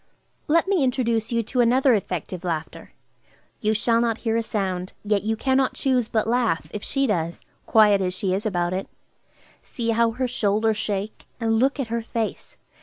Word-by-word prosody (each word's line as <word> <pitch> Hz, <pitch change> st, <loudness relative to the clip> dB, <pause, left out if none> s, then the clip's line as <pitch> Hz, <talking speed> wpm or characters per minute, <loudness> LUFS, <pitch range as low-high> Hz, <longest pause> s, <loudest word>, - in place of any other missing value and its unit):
Let 335 Hz, +4 st, +3 dB
me 385 Hz, -7 st, +2 dB
introduce 235 Hz, -4 st, 0 dB
you 230 Hz, -1 st, +1 dB
to 245 Hz, +3 st, 0 dB
another 255 Hz, +2 st, +4 dB
effective 185 Hz, -3 st, -3 dB
laughter. 165 Hz, -3 st, -5 dB, 0.7 s
You 215 Hz, 0 st, +1 dB
shall 230 Hz, +1 st, +2 dB
not 230 Hz, -2 st, 0 dB
hear 225 Hz, 0 st, +1 dB
a 230 Hz, -, +2 dB
sound, 190 Hz, -4 st, -3 dB
yet 210 Hz, -1 st, +1 dB
you 220 Hz, +2 st, -1 dB
cannot 265 Hz, +2 st, +1 dB
choose 255 Hz, -4 st, +1 dB
but 220 Hz, -2 st, 0 dB
laugh, 230 Hz, -10 st, +1 dB
if 210 Hz, -, -6 dB
she 275 Hz, 0 st, 0 dB
does, 170 Hz, -7 st, -1 dB, 0.3 s
quiet 210 Hz, -3 st, +5 dB
as 180 Hz, -1 st, -1 dB
she 190 Hz, 0 st, -1 dB
is 195 Hz, +2 st, -1 dB
about 175 Hz, -5 st, -1 dB
it. 190 Hz, +1 st, -3 dB, 0.7 s
See 230 Hz, -2 st, -4 dB
how 230 Hz, +1 st, +3 dB
her 255 Hz, +2 st, -1 dB
shoulders 220 Hz, -2 st, +1 dB
shake, 210 Hz, -1 st, -4 dB
and 225 Hz, -1 st, +1 dB
look 275 Hz, +4 st, +2 dB
at 255 Hz, -5 st, -2 dB
her 235 Hz, -, 0 dB
face! 225 Hz, -1 st, -4 dB
225 Hz, 185 wpm, -24 LUFS, 200-240 Hz, 0.7 s, quiet